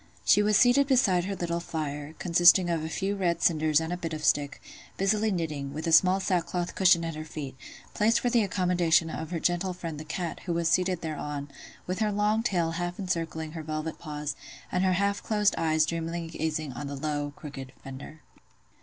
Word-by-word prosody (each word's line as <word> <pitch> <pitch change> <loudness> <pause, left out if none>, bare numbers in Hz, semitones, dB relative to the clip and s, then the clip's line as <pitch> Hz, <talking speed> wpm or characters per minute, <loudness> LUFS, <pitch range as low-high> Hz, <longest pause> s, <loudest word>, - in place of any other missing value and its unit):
She 205 - +5
was 210 0 +3
seated 260 +3 +5
beside 200 -10 +3
her 200 0 -3
little 170 -1 -2
fire 150 -2 -5
(consisting 175 +1 +5
of 165 -2 -1
a 160 - -4
few 195 +4 -2
red 175 -4 0
cinders 155 -2 +3
and 165 +2 -3
a - - -3
bit 165 -2 -5
of 155 -1 -4
stick), 145 -1 +1 0.4
busily 210 +3 +2
knitting, 150 -6 -3
with 155 - -4
a 165 - 0
small 185 +4 +5
sackcloth 180 -1 -1
cushion 175 -3 +4
at 165 - -3
her 155 0 -6
feet, 150 -4 -7 0.4
placed 220 +2 +3
for 245 - 0
the 235 -1 +4
accommodation 175 -4 +2
of 160 0 -5
her 170 - -3
gentle 175 +2 0
friend 165 -4 -6
the - - -6
cat, 165 +2 -4
who 175 - 0
was 170 0 0
seated 180 0 +1
thereon, 150 -2 -5 0.3
with 185 +2 -3
her 215 -1 +1
long 210 +2 +1
tail 175 -8 0
half 175 +1 -3
encircling 165 -4 -3
her 160 0 -6
velvet 155 +1 -4
paws, 150 -2 -4 0.4
and 180 - +1
her 185 -1 +3
half 200 +2 0
closed 210 -2 +2
eyes 155 -1 +2
dreamily 165 +1 -3
gazing 155 -3 -3
on 140 +4 -6
the 140 - -5
low, 145 0 -2
crooked 135 -3 -8
fender. 135 +3 -9
170 Hz, 200 wpm, -28 LUFS, 155-185 Hz, 0.4 s, She